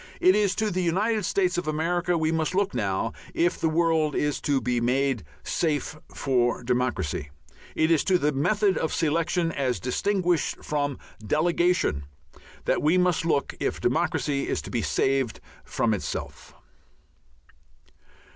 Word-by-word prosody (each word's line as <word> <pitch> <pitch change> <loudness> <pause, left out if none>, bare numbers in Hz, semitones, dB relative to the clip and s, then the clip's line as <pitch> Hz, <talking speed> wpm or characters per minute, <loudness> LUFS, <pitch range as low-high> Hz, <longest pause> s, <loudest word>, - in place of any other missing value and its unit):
It 185 +1 +5
is 205 -2 +2
to 220 -1 0
the 185 +1 -1
United 205 +5 +1
States 180 -1 +1
of 175 - -6
America 175 +3 0
we 160 0 +1
must 160 +2 -1
look 200 0 +1
now 100 +2 -1 0.2
if 175 +1 +1
the 160 - +2
world 160 -2 +2
is 150 -1 0
to 140 -2 +1
be 125 -2 -1
made 130 -1 +1 0.2
"safe 155 -2 -1 0.2
for 125 -2 0
democracy." 120 - -1 0.5
It 160 +1 +2
is 160 - +4
to 185 - +4
the 150 -3 +1
method 195 +8 +1
of 160 - -1
selection, 165 +2 0
as 130 -5 -1
distinguished 180 +5 0
from 145 -2 -1 0.3
delegation, 170 - +1 0.6
that - - +1
we 160 +5 +3
must 180 -2 +2
look 145 -4 0
if - - -2
democracy 145 0 0
is - - 0
to - - -8
be 120 - 0
saved 115 - 0 0.2
from - - 0
itself. - - -5
155 Hz, 145 wpm, -26 LUFS, 135-175 Hz, 0.6 s, It